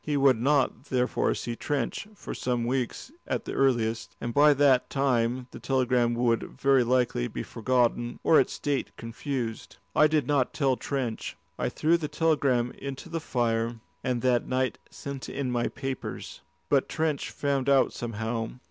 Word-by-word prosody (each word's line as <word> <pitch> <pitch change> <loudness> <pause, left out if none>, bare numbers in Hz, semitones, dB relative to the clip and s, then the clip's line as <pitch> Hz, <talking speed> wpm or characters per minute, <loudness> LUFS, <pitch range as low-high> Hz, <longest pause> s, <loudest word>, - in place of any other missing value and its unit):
He 150 -1 0
would 135 -4 +4
not, 140 +1 +2
therefore, 125 -1 +1
see 120 - -4
Trench 140 - -2
for - - -7
some 120 -2 -1
weeks 130 - -2 0.2
at - - -2
the - - -4
earliest, 115 -4 +1
and 120 0 -4
by 145 +2 +6
that 135 -2 +4
time 125 -2 +1
the - - -9
telegram 125 -3 +1
would 115 -1 +2 0.2
very 135 -2 +4
likely 120 - +1
be - - -5
forgotten 120 0 0
or 160 - +6
its 130 - 0
date 145 -2 -1
confused. 115 0 -5 0.2
I 155 - +6
did 155 -3 +1
not 140 -2 +1
tell 135 -4 +2
Trench. 125 -4 -3 0.2
I - - 0
threw 165 +2 +2
the 155 -3 -3
telegram 145 -6 +1
into 140 +4 -6
the 165 0 -2
fire, 115 -5 0 0.3
and 125 -2 -1
that 125 -2 +2
night 130 0 0
sent 140 -2 -7
in 135 -3 -2
my 120 -1 +1
papers. 135 -1 -6 0.3
But - - +2
Trench 155 -3 -1
found 140 -2 -1
out 135 -1 +4
somehow. 115 0 -3
130 Hz, 165 wpm, -27 LUFS, 120-140 Hz, 0.3 s, by